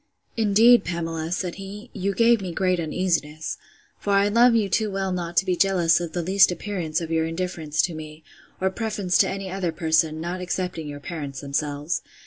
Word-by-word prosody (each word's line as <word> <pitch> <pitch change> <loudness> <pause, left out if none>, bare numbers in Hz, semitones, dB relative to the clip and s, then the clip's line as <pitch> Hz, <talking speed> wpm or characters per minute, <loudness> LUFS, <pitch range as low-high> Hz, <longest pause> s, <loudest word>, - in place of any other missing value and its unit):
Indeed, 225 +2 +5
Pamela, 165 -1 -3
said 180 -1 -2
he, 205 +4 -9
you 195 -1 -2
gave 230 -2 +4
me 185 -2 -4
great 185 0 +1
uneasiness; 160 -2 -2 0.4
for 200 - -1
I 200 +1 +4
love 235 +2 +5
you 215 -3 +2
too 215 +3 0
well 195 -1 -2
not 175 -2 -4
to 195 - +4
be 185 -2 +1
jealous 175 -4 +3
of 170 -2 -5
the 175 - -2
least 195 +2 +5
appearance 175 -3 -3
of 165 -1 -5
your 160 0 +1
indifference 165 -3 -2
to 175 - -1
me, 155 0 -9 0.4
or 190 0 +1
preference 205 -4 -2
to - - +4
any 195 -1 -5
other 185 -3 -2
person, 160 -1 +1
not 175 +3 -4
excepting 180 -3 -3
your 145 -1 -7
parents 145 -5 -6
themselves. 145 +2 -2
180 Hz, 190 wpm, -24 LUFS, 160-195 Hz, 0.4 s, Indeed